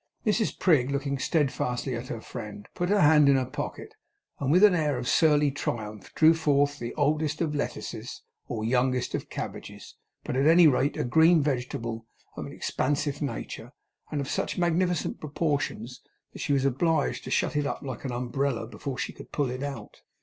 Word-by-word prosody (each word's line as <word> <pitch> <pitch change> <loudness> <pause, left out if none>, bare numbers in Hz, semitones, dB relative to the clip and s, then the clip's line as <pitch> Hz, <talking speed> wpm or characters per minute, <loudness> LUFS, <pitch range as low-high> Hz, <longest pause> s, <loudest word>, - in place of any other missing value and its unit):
Mrs 215 0 +1
Prig, 145 -8 +3
looking 140 0 -2
steadfastly 135 -4 0
at 120 +2 -6
her 115 - -5
friend, 105 -4 -8
put 175 +1 -2
her 205 -1 +3
hand 150 -2 +6
in 140 - +6
her 130 -1 +1
pocket, 130 - -6 0.5
and 140 0 0
with 180 +5 +5
an 210 -3 +8
air 150 -5 +1
of 125 0 -4
surly 150 -2 +4
triumph 110 -7 -5
drew 160 0 +6
forth 145 -3 +1
either - - -3
the - - -5
oldest 150 +1 +1
of 160 -3 -1
lettuces 145 - -5 0.2
or 110 -2 -3
youngest 125 +1 +1
of - - -4
cabbages, - - -7 0.3
but - - -3
at 135 +3 +3
any 170 +2 +7
rate, 140 0 +2
a - - 0
green 160 +5 +5
vegetable 120 -4 -3 0.3
of - - -5
an - - -9
expansive 145 +1 -1
nature, 145 - -5 0.4
and 150 - -2
of 135 - -4
such - - -2
magnificent 175 -1 0
proportions 145 -5 -2 0.3
that - - -10
she - - -2
was 135 -1 +2
obliged 150 +3 +1
to - - -7
shut - - 0
it 145 -1 +1
up - - -4
like 130 -4 -6
an 135 - -3
umbrella 125 0 -1
before 130 +3 -6
she - - -3
could - - -13
pull 140 -4 0
it 130 +1 -5
out. 140 -1 -7
140 Hz, 190 wpm, -27 LUFS, 125-155 Hz, 0.5 s, an